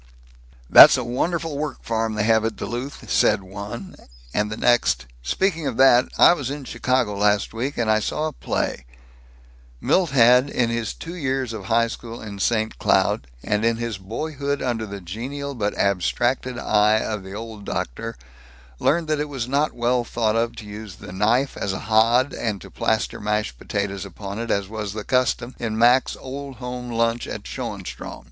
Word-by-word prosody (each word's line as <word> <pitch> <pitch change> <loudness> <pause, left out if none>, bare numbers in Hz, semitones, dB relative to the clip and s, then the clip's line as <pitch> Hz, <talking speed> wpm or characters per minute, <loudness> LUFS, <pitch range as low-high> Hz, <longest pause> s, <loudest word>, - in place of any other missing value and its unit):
"That's - - +10
a 125 - -2
wonderful 155 +5 -2
work 150 -1 -4
farm 115 -1 -1
they 105 - 0
have 110 0 +3
at 110 -1 -1
Duluth," 125 +4 -6
said 100 - +3
one, 100 +2 -8 0.4
and 105 0 0
the 105 - -4
next, 120 - +2 0.2
"speaking 160 - 0
of 125 -4 -3
that, 130 -2 +6
I - - +8
was 140 -7 -3
in 145 0 -5
Chicago 125 -4 0
last 105 +1 +1
week, 130 +5 -3
and 120 - 0
I 110 0 +4
saw 150 +8 -2
a 155 - -5
play - - -3 0.5
" - - -27
Milt 185 -3 +4
had, 125 +1 +5
in 120 -4 0
his 115 -2 -2
two 165 - -8
years 135 -7 -2
of 110 - -7
high 115 0 +3
school 115 0 -7
in 105 -2 -8
St. 110 +1 0
Cloud, - - +2 0.2
and 105 0 0
in 115 0 +2
his 115 -4 -4
boyhood 140 +7 -3
under 115 -4 -2
the 100 -1 -7
genial 130 +10 -5
but 105 -5 -2
abstracted 120 +6 0
eye 105 -1 +3
of 105 -2 -3
the 95 0 -9
Old 110 -1 -7
Doctor, 115 - -4 0.6
learned 170 +1 +2
that 155 -1 0
it 150 0 -2
was 130 -5 -4
not 145 +3 +1
well 120 +1 +1
thought 115 -2 0
of 115 +1 0
to 110 - -9
use 105 -2 -8
the - - -11
knife 115 +8 +1
as 100 - -2
a - - -3
hod 115 +5 +3
and 105 -4 -2
to - - -12
plaster - - -1
mashed 105 - -2
potatoes 100 -1 -3
upon 100 +2 -7
it, 115 0 -4
as 100 -2 0
was 105 -1 -5
the 110 -1 -5
custom 125 0 0
in 110 -2 -2
Mac's 120 +3 +4
Old 135 +1 -7
Home 125 +1 -6
Lunch 115 0 0
at - - -6
Schoenstrom. - - -6
115 Hz, 185 wpm, -23 LUFS, 105-130 Hz, 0.6 s, That's